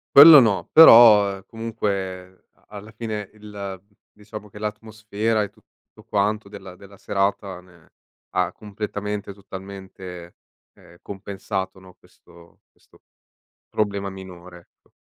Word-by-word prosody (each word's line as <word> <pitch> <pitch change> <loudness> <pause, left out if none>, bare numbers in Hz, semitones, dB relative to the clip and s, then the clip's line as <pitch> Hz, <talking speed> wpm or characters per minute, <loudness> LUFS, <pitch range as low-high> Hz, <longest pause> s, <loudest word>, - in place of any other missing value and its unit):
Quello 150 +1 +11
no, 110 -6 +1
però, 110 -9 +8
uhm, 95 - -13
comunque 100 -5 -5
a - - -34
alla 105 +1 -11
fine 110 -2 -6
il 100 -3 -9 0.3
diciamo 105 0 -12
che 105 - -14
l'atmosfera 110 0 -3
e 100 - -6
tutto - - -25
quanto 105 0 -1
della 95 -3 -11
della 100 +1 -16
serata 100 -1 -2
ne 85 -3 -23 0.4
ha - - -1
completamente, 105 -1 -6
totalmente, 95 -2 -11 0.4
ehm, 85 +1 -20
compensato, 95 -1 -6
no, 95 -1 -17
questo 85 0 -22
questo - - -27 0.7
problema 100 -2 -2
minore, 90 -2 -12
ecco. - - -37
100 Hz, 120 wpm, -22 LUFS, 95-105 Hz, 0.7 s, Quello